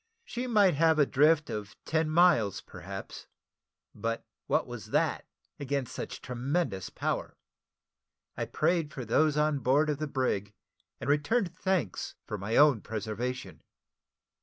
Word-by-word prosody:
She 245 +1 -4
might 205 -6 +5
have 160 +2 +4
a 145 - +5
drift 150 +3 +3
of 105 -1 -5
ten 160 -1 +1
miles, 155 - +4
perhaps; - - -9 0.7
but 115 +2 -3 0.2
what - - +2
was - - -8
that - - 0 0.3
against 140 -2 -2
such - - -6
tremendous 125 - -2
power? - - -3 1.0
I - - -2
prayed 165 -1 0
for 130 -3 -6
those 150 +6 +3
on 150 -1 +2
board 145 +4 +3
of 145 - -3
the 155 - -2
brig, 105 -8 -1 0.4
and - - -6
returned 170 +6 +1
thanks 185 - -1
for 105 - -5
my 105 +4 -2
own 145 -7 +6
preservation. 115 +4 -4
145 Hz, 135 wpm, -30 LUFS, 115-160 Hz, 1.0 s, own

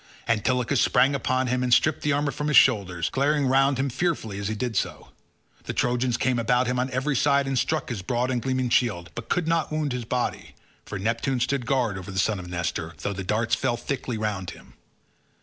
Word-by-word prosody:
Antilochus 125 +4 +1
sprang 135 +2 +4
upon 130 -1 0
him 125 0 0
and 125 -1 -1
stripped 155 +5 +3
the 150 - +1
armour 145 0 +1
from 145 +3 -4
his 150 - +4
shoulders, 95 - +3
glaring 145 +1 +1
round 135 +1 +3
him 135 +1 0
fearfully 135 - -2
as 100 - -3
he 110 - -2
did 120 +1 -3
so. - - -2 0.6
The - - -3
Trojans 120 -1 +1
came 125 -2 +1
about 125 +2 +2
him 125 0 -1
on 130 +1 0
every 135 +3 -1
side 140 +1 +3
and 135 0 -2
struck 155 +5 0
his 115 -6 -3
broad 125 +6 -1
and 125 -2 -1
gleaming 130 -1 -1
shield, 90 -9 +1
but 120 -1 -8
could 175 -2 0
not 165 -2 +1
wound 155 -3 -1
his 125 -2 -4
body, 125 +2 -3 0.3
for 100 - -5
Neptune 115 +6 -1
stood 125 0 -1
guard 120 -8 0
over 90 +1 -9
the 95 - -6
son 100 +2 +1
of 90 - -8
Nestor, 85 -1 -3
though 100 - -1
the 95 0 -5
darts 110 +4 -1
fell 120 +1 +1
thickly 125 -2 -3
round 105 -4 -3
him. - - -13
125 Hz, 220 wpm, -25 LUFS, 110-135 Hz, 0.6 s, sprang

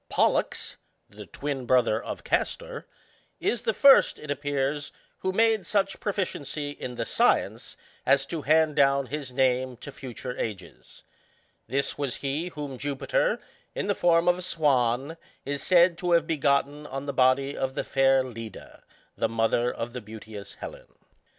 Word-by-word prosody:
PolltuCy - - +1 0.3
the - - -11
twin 135 -3 -4
brother 115 -3 +3
of - - -6
Castor, - - -2 0.5
is 240 - 0
the 225 - 0
first, 275 -1 +6
it 150 - -6
appears, 145 0 -2 0.3
who 190 - -1
made 220 -2 +2
such 195 -2 0
proficiency 155 -7 -3
in 125 -3 -7
the 115 - -2
science - - +1 0.3
as 135 +1 +3
to 160 +2 -4
hand 155 0 +3
down 140 -1 +4
his 140 -1 -5
name 130 -1 +1
to 140 - -9
future 125 -1 -7
ages; 95 -6 -7 0.7
ihis 140 +3 -1
was 140 -4 -1
he 145 +5 -2
whom 145 -6 -6
Jupiter, 145 - 0 0.4
in - - -2
the 205 - +1
form 170 -2 +3
of 175 0 +4
a - - -5
swan, 140 -4 +1 0.3
is 140 0 -3
said 175 -1 +4
to 175 -1 +1
have 165 -2 +4
be 165 -1 -1
gotten 145 +1 +1
on 135 +1 -5
the 140 - -3
body 135 +2 +3
of 130 0 -2
the - - -1
fair 135 -1 +3
Leda, 115 -3 -9 0.3
the - - 0
mother 115 +2 +1
of 120 +1 -5
the 125 - -5
beauteous 105 -1 -10
Helen. - - -10
140 Hz, 160 wpm, -27 LUFS, 130-165 Hz, 0.7 s, first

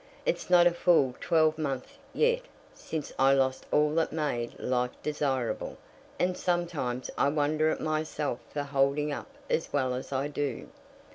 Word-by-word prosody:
It's - - -1
not 175 -1 +7
a 175 - +6
full 165 -7 +3
twelvemonth 155 -5 0
yet 480 +1 +2 0.3
since 155 -3 -5
I 135 +1 +6
lost 130 -1 0
all 150 0 +3
that 165 0 +1
made 145 -7 -2
life 125 -1 0
desirable, 135 -5 -1 0.4
and 180 0 +1
sometimes 170 -10 -1
I 140 - +4
wonder 155 +1 +2
at - - -1
myself 155 -4 -1
for 145 - -2
holding 140 +1 +1
up 145 - -5 0.2
as 160 - -1
well 130 -3 +1
as 125 +2 -5
I 135 +1 0
do." 145 -3 -3
150 Hz, 150 wpm, -29 LUFS, 135-160 Hz, 0.4 s, not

